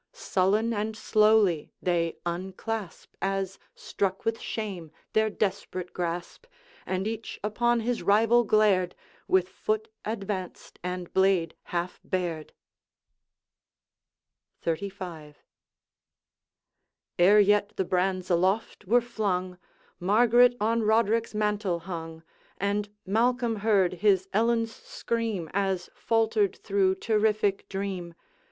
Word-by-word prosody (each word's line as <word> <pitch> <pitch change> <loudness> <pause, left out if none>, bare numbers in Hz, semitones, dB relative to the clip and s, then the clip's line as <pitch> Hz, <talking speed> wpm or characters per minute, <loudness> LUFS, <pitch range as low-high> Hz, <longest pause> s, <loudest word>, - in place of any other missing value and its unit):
Sullen 215 - +1
and 215 +1 -2
slowly 215 -7 +3
they 170 -2 0
unclasp, 190 +3 -5
As 195 -1 -2 0.2
struck 195 -1 -3
with 225 0 0
shame, 190 -8 -5 0.2
their 220 0 +3
desperate 185 -3 -3
grasp, 175 - -4 0.4
And 190 +2 -1
each 225 0 -5
upon 240 +3 +1
his 240 +1 -1
rival 225 +6 +4
glared, 205 -5 +3 0.3
With 185 -1 +3
foot 215 +3 -2
advanced 200 -4 -5
and 180 -1 -5
blade 190 -3 +3
half 175 +1 -3
bared. 175 -4 -3 2.1
XXXV. 165 -3 -4 1.8
Ere 200 +4 +7
yet 205 0 +3
the 190 - -1
brands 185 0 0
aloft 190 +5 +1
were 240 +6 +4
flung, 185 -6 -2 0.4
Margaret 240 +6 +5
on 225 +2 +1
Roderick's 225 +1 +2
mantle 210 -4 0
hung, 165 -2 -7 0.3
And 205 +1 -1 0.2
Malcolm 235 +3 +1
heard 200 -4 +2
his 195 -3 +3
Ellen's 230 +1 +2
scream, 225 -7 -3
As 195 -2 -1
faltered 220 -3 +1
through 195 -2 +1
terrific 210 -1 +1
dream. 190 -3 -4
200 Hz, 105 wpm, -27 LUFS, 185-220 Hz, 2.1 s, Ere